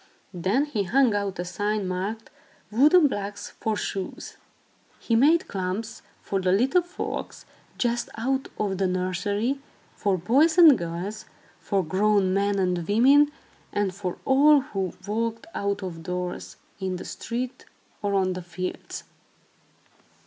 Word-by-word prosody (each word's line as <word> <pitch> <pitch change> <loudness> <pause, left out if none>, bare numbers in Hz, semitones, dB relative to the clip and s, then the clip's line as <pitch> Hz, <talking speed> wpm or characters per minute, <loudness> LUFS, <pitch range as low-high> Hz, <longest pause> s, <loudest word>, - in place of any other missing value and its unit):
Then 190 - +1
he 250 -9 -2
hung 240 +4 +3
out 200 -2 -2
a 175 - -3
sign, 205 +2 -1
marked 195 +5 -4 0.4
"Wooden 300 +9 +6
blocks 205 -5 -3
for 220 -1 -1
shoes." 195 -2 -5 0.6
He 230 - -1
made 305 +8 +4
klomps 195 +4 -4 0.2
for 195 -1 -1
the 185 0 +2
little 260 - +3
folks 350 +1 -6 0.3
just 240 -1 0
out 265 +4 -1
of 195 -3 -1
the 190 - +2
nursery, 200 +8 -1 0.4
for 200 -2 0
boys 280 - +3
and 325 -6 +9
girls, 190 +4 -5 0.3
for 195 -2 0
grown 195 +2 +2
men 200 +1 +1
and 180 -3 0
women, 275 +8 +5 0.4
and 205 -2 0
for 185 -2 -4
all 285 +2 +6
who 195 - -3
walked 225 +3 -2
out 200 0 -2
of 170 -3 -6
doors, 180 +1 -5 0.2
in 190 -1 -2
the 180 - -7
street 245 +2 -5 0.4
or 200 -1 0
on 185 -1 +2
the 180 - -5
fields. 180 +1 -6
205 Hz, 140 wpm, -25 LUFS, 185-245 Hz, 0.6 s, and